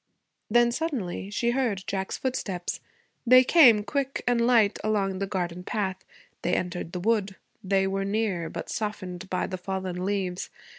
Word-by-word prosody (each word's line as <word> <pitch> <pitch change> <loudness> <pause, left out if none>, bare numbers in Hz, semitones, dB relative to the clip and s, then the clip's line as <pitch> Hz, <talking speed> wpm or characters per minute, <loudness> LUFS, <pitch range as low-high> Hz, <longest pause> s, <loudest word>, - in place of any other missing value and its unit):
Then, 240 +1 +4
suddenly, 235 - -3
she 235 +3 0
heard 240 -7 0
Jack's 190 -1 -3
footsteps. 195 -9 -3 0.4
They 255 +1 +7
came, 245 -8 +6
quick 275 +4 -2
and 245 -1 +2
light, 235 -4 +4
along 195 -3 0
the 195 - -1
garden 180 -2 -3
path; 195 -2 -2 0.4
they - - +1
entered 175 -2 -3
the 180 - -3
wood; 205 -1 0 0.3
they 195 0 +2
were 195 0 -1
near, 200 -5 -1
but - - -6
softened 190 -4 -4
by 185 - 0
the 185 -1 -5
fallen 185 -1 -4
leaves. 190 -2 -2
200 Hz, 155 wpm, -27 LUFS, 185-235 Hz, 0.4 s, They